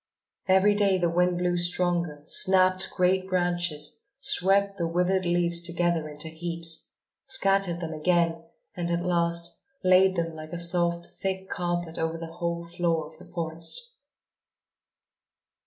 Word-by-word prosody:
Every 190 Hz, +2 st, +4 dB
day 200 Hz, -2 st, +2 dB
the 175 Hz, -2 st, 0 dB
wind 180 Hz, +1 st, +1 dB
blew 175 Hz, 0 st, 0 dB
stronger, 175 Hz, -3 st, 0 dB
snapped 185 Hz, 0 st, +4 dB
great 185 Hz, +1 st, 0 dB
branches, 175 Hz, -4 st, -1 dB, 0.2 s
swept 200 Hz, -4 st, +3 dB
the 170 Hz, -, 0 dB
withered 180 Hz, +2 st, 0 dB
leaves 170 Hz, 0 st, +1 dB
together 170 Hz, -2 st, -1 dB
into 150 Hz, +1 st, -4 dB
heaps, 165 Hz, 0 st, -2 dB, 0.4 s
scattered 195 Hz, -8 st, +4 dB
them 165 Hz, -1 st, -5 dB
again 165 Hz, +1 st, 0 dB, 0.3 s
and, 175 Hz, -3 st, -4 dB
at 170 Hz, +1 st, -1 dB
last, 170 Hz, -1 st, -1 dB, 0.2 s
laid 185 Hz, +1 st, +4 dB
them 165 Hz, -1 st, -2 dB
like 155 Hz, 0 st, -10 dB
a -, -, -3 dB
soft, 170 Hz, 0 st, +1 dB, 0.2 s
thick 190 Hz, 0 st, -3 dB
carpet 175 Hz, -2 st, -3 dB
over 160 Hz, 0 st, -2 dB
the 165 Hz, 0 st, -8 dB
whole 170 Hz, 0 st, -4 dB
floor 170 Hz, -2 st, -1 dB
of 155 Hz, +1 st, -16 dB
the -, -, -13 dB
forest. 165 Hz, -, -3 dB
175 Hz, 140 wpm, -26 LUFS, 170-185 Hz, 0.4 s, Every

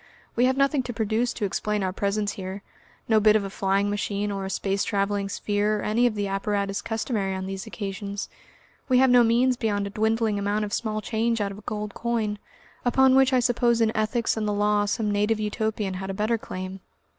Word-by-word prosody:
We 245 Hz, -, +4 dB
have 260 Hz, +1 st, +2 dB
nothing 275 Hz, 0 st, +3 dB
to 245 Hz, -1 st, -6 dB
produce 225 Hz, +2 st, 0 dB
to 210 Hz, -, -2 dB
explain 210 Hz, +1 st, -1 dB
our 185 Hz, -1 st, -1 dB
presence 200 Hz, +1 st, -1 dB
here, 195 Hz, 0 st, -6 dB, 0.4 s
no 220 Hz, -1 st, +4 dB
bit 215 Hz, 0 st, +5 dB
of 215 Hz, -, +2 dB
a 195 Hz, -, -5 dB
flying 195 Hz, +1 st, +1 dB
machine 205 Hz, 0 st, -2 dB
or 195 Hz, -1 st, -3 dB
a -, -, -4 dB
space 195 Hz, 0 st, -1 dB
travelling 200 Hz, 0 st, -1 dB
sphere 205 Hz, +1 st, 0 dB
or -, -, -4 dB
any 235 Hz, +3 st, +3 dB
of 225 Hz, -, -2 dB
the 205 Hz, -1 st, -1 dB
apparatus 200 Hz, 0 st, -1 dB
customary 215 Hz, -4 st, -2 dB
on 190 Hz, 0 st, -4 dB
these 195 Hz, 0 st, -5 dB
occasions. 200 Hz, 0 st, -5 dB, 0.6 s
We 255 Hz, -, +5 dB
have 260 Hz, 0 st, +5 dB
no 245 Hz, -1 st, +7 dB
means 245 Hz, +2 st, +3 dB
beyond 205 Hz, -3 st, 0 dB
a 200 Hz, -, -5 dB
dwindling 220 Hz, -1 st, +1 dB
amount 205 Hz, +1 st, 0 dB
of 205 Hz, -, -7 dB
small 215 Hz, -2 st, -1 dB
change 230 Hz, +1 st, 0 dB
out 200 Hz, -1 st, -1 dB
of 200 Hz, -, -9 dB
a -, -, -18 dB
gold 210 Hz, -1 st, -4 dB
coin, 225 Hz, -3 st, -2 dB, 0.4 s
upon 260 Hz, +2 st, +4 dB
which 265 Hz, 0 st, +5 dB
I 255 Hz, -1 st, +3 dB
suppose 240 Hz, -1 st, +2 dB
in 225 Hz, 0 st, +2 dB
ethics 220 Hz, +2 st, 0 dB
and 215 Hz, -1 st, -2 dB
the 210 Hz, -, 0 dB
law 205 Hz, 0 st, +2 dB
some 210 Hz, +1 st, -1 dB
native 210 Hz, +2 st, +1 dB
Utopian 215 Hz, -2 st, -2 dB
had 190 Hz, +1 st, -5 dB
a 195 Hz, -, -3 dB
better 220 Hz, +3 st, 0 dB
claim. 185 Hz, -1 st, -6 dB
210 Hz, 215 wpm, -25 LUFS, 200-230 Hz, 0.6 s, no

